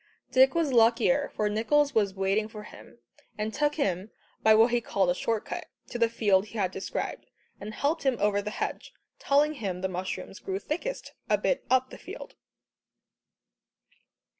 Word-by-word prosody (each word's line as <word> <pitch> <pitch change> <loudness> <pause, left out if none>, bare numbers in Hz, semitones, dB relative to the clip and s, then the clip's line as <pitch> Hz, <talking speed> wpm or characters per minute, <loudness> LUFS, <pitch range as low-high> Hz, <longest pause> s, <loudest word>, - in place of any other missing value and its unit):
Dick 265 +2 +5
was 320 -5 +1
luckier, 240 +5 +3
for 210 - +1
Nicholls 280 +7 +2
was 205 -4 +1
waiting 195 +3 +1
for 215 -1 -9
him, 120 - -14 0.4
and 215 +1 -3
took 295 0 +1
him 195 - -1 0.3
by 220 0 +6
what 225 +2 +5
he 240 0 +2
called 195 -5 +1
a - - +2
short 220 +4 -2
cut, - - -5 0.2
to 240 - -5
the 230 -1 +4
field 205 -3 +2
he 230 - -9
had 190 -3 0
described, 190 - -4 0.3
and 215 +2 -7
helped 305 +4 0
him 265 -3 +1
over 205 0 +2
the 210 - -4
hedge, - - -4 0.3
telling 290 +2 +3
him 195 -9 -4
the 190 - 0
mushrooms 185 +1 -5
grew 190 0 -3
thickest 345 - -4 0.2
"a - - +4
bit - - 0
up 255 0 +2
the - - -10
field." - - -9
220 Hz, 175 wpm, -28 LUFS, 200-265 Hz, 0.4 s, by